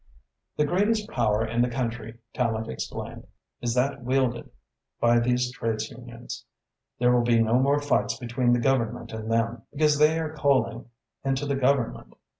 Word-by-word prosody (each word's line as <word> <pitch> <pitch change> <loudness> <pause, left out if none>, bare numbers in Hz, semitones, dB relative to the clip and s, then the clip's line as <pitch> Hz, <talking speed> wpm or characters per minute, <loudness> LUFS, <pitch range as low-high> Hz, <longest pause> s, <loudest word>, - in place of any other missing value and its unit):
"The 150 - +3
greatest 210 +6 +1
power 110 -2 +1
in 120 +2 0
the 125 - +2
country," 120 -2 -4 0.2
Tallente 115 -3 -1
explained, 65 - -6 0.3
"is 120 0 -1
that 135 +2 0
wielded 125 -1 0 0.5
by 120 0 +4
these 125 +1 +1
trades 115 -3 -3
unions. 120 -1 -9 0.5
There 125 0 +3
will 120 - +4
be 120 -1 +3
no 115 +2 +3
more 140 +2 +3
fights 145 0 0
between 120 0 0
the 120 - +3
Government 120 -2 0
and 110 0 -5
them, 115 0 0
because 150 0 +2
they 155 +2 +5
are 160 -1 -3
coaling 120 -5 +1 0.3
into 135 +1 0
the 140 -1 0
Government. 135 -2 0
125 Hz, 160 wpm, -26 LUFS, 115-135 Hz, 0.5 s, they